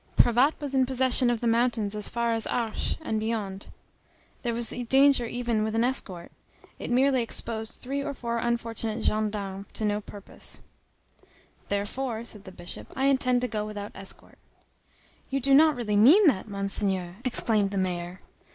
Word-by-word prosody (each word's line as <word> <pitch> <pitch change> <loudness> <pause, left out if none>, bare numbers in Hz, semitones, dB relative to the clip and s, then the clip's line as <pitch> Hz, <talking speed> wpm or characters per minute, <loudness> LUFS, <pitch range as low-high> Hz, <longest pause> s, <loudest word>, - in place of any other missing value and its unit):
Cravatte 245 +6 +4
was 285 -2 -5
in 260 -1 +3
possession 260 -1 +4
of 240 -2 -1
the 240 - 0
mountains 230 -3 +1
as 210 -1 +1
far 235 -1 0
as 225 -1 -1
Arche, 230 -3 -2
and 220 -9 -2
beyond; 215 -3 -3 0.7
there 240 - -1
was 235 0 +3 0.2
danger 270 -3 +5
even 235 -2 -1
with 220 0 -2
an 225 - +2
escort; 195 -9 -1 0.5
it - - -6
merely 260 +1 +3
exposed 225 -1 -2
three 275 +2 -3
or 285 -1 -4
four 235 -1 -3
unfortunate 230 -1 -2
gendarmes 205 -2 -2
to 215 - -2
no 210 0 0
purpose. 200 -1 -6 1.1
"Therefore," 220 +4 -3
said 210 -4 -6
the 190 - -9
Bishop, 175 -1 -7
"I 270 - 0
intend 255 -2 +2
to 250 - 0
go 215 -2 -3
without 210 -1 -6
escort." 195 0 -5 0.9
"You 275 - -1
do 275 +1 +2
not 305 +2 +6
really 210 -4 -1
mean 305 - +7
that, 230 - +3
Monseigneur!" 195 -3 0
exclaimed 220 -5 +1
the 200 - -4
mayor. 180 -1 -3
230 Hz, 165 wpm, -27 LUFS, 205-250 Hz, 1.1 s, mean